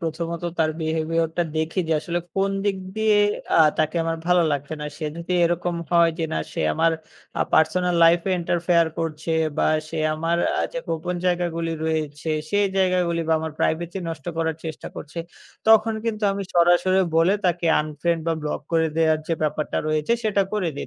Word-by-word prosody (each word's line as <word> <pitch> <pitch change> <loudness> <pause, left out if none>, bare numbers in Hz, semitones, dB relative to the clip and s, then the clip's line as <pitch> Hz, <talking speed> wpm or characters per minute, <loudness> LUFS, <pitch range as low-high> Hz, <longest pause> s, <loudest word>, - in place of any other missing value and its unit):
প্রথমত 170 0 -4 0.2
তার 160 -1 +3
behavior 160 +1 0
টা 175 - +3
দেখি 160 +4 0
যে, - - +2
আসলে 175 +2 -2 0.2
কোন 195 0 +1
দিক 200 -1 +1 0.2
দিয়ে 220 -1 +3 0.4
আ - - +6 0.2
তাকে 155 +2 +1
আমার 165 0 -1
ভালো 180 0 +4
লাগছে 145 +2 -3
না। - - -4
সে 155 - -4
যদি 170 +2 -4
এরকম 175 +1 0 0.2
হয় 170 -1 +5
যে 165 - 0
না - - 0
সে - - -3
আমার 165 0 +3 0.5
আ - - -1
personal 175 +3 +3
life 170 +1 +6
এ - - +1
interfere 170 -1 +2
করছে 160 0 -3 0.3
বা - - +3 0.2
সে 160 0 -5 0.2
আমার 165 +2 0 0.2
আ - - +2
যে - - -3
গোপন 165 +2 -2
জায়গাগুলি 170 -2 0
রয়েছে, 155 -1 -2 0.2
সেই 205 0 +3
জায়গাগুলি 180 -3 +2
বা - - +4
আমার 160 -1 -4
privacy 170 +3 -1
নষ্ট 165 +1 -7
করার 160 -1 -1
চেষ্টা 160 -1 -6
করছে, 155 +3 -8 0.5
তখন 220 0 +5
কিন্তু 220 -2 -2
আমি 200 0 -3
সরাসরি 175 +2 +4 0.2
বলে 165 +3 +4
তাকে 175 -1 +1 0.2
unfriend 155 +2 -1
বা 165 - +2
block 150 - -3
করে 160 -1 +3
দেয়ার 160 -1 +3
যে - - +1
ব্যাপারটা 155 0 -1
রয়েছে 155 +7 +1
সেটা 205 -2 +2
করে 205 -5 0
দেই। - - -5
165 Hz, 185 wpm, -23 LUFS, 160-180 Hz, 0.5 s, আ